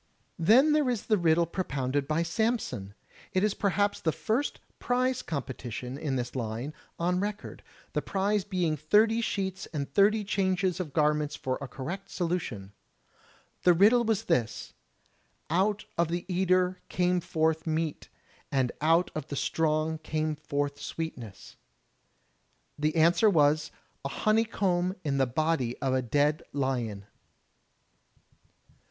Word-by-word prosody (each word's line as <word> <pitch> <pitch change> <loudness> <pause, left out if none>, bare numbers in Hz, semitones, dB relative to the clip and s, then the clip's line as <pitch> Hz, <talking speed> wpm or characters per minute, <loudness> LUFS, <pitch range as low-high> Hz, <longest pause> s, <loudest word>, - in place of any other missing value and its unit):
Then 245 - +6
there 300 -4 +3
is 240 -4 -2
the 215 - +3
riddle 170 0 +3
propounded 140 -6 -2
by 155 +2 +1
Samson. 170 - -1 0.4
It 185 - +2
is 210 -1 +2
perhaps 205 0 +1
the 160 - +1
first 235 - -1 0.2
prize 255 +1 +1
competition 130 -4 -5
in 140 -1 -2
this 120 0 -3
line 120 +4 -3 0.2
on 180 +2 +1
record, 205 +1 -4 0.3
the - - 0
prize 200 +1 0
being 180 -6 0
thirty 215 +10 +3
sheets 190 -3 -2
and 145 -4 -4
thirty 205 +7 +3
changes 190 -2 0
of 170 -5 -4
garments 150 0 +1
for 130 0 -3
a 140 - -4
correct 170 +10 -6
solution. 160 - -3 0.9
The 180 - +6
riddle 215 +8 +5
was 220 -2 0
this: 115 - -1 0.8
"Out 200 +5 +1
of 170 - +3
the 175 +1 -3
eater 185 0 +2
came 180 0 +1
forth 160 -1 0
meat, 160 -1 -2 0.4
and 130 -3 +1
out 165 +3 +3
of 155 -1 -5
the 145 - -5
strong 155 +1 0
came 155 0 -2
forth 145 -1 -3
sweetness.*' 120 -14 -7 1.2
The 150 +2 -1
answer 170 +6 +5
was, 150 -3 +3 0.3
"A 140 - -2
honeycomb 195 -2 +1
in 140 -3 0
the 135 - +3
body 130 -2 0
of 135 -1 -1
a 130 - +2
dead 145 +5 +1
lion." 120 -8 -2
165 Hz, 135 wpm, -29 LUFS, 145-195 Hz, 1.2 s, Then